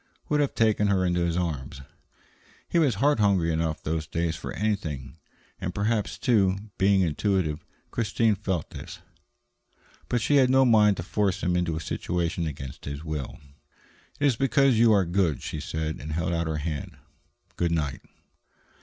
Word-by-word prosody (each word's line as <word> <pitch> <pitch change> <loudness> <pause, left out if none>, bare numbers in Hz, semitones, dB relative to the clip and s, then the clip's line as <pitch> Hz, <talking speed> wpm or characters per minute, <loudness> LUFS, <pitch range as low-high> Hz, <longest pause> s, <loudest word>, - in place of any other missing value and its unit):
would 150 - +2
have 145 -2 0
taken 110 -2 +3
her 95 -2 +2
in 90 - +1
his 85 -1 0
arms. 70 -6 -3 0.9
He 170 - +1
was 140 -9 +3
heart 140 +4 +2
hungry 95 -6 +3
enough, 80 -1 -2
those 80 0 -2
days, 85 0 -1
for - - -6
anything. 80 -11 -3 0.4
And 90 - -4
perhaps, 105 +1 0
too, 100 -7 +2 0.2
being 95 0 +4
intuitive, 85 -2 0 0.3
Christine 110 0 +1
felt 95 -5 -3
this. 85 +6 -8 1.1
But 120 - +1
she 145 +5 +3
had 130 -2 +5
no 130 0 +5
mind 105 -4 +5
to - - -4
force 100 0 -1
him 90 0 +1
into 85 -2 0
a - - -2
situation 85 +1 -2
against 70 -3 -7
his 70 +2 -5
will. 75 -4 -5 0.8
"It 145 - +1
is 135 -4 +4
because 135 -1 +3
you 115 -1 +6
are 100 -3 +4
good," 85 -4 0
she 75 - -4
said, 80 +1 -3
and 75 +1 -5
held 85 +2 -1
out 85 -1 -1
her 80 -1 -2
hand. 75 -1 -4 0.6
"Good 85 -1 0
night." 75 -5 -1
90 Hz, 170 wpm, -26 LUFS, 80-105 Hz, 1.1 s, you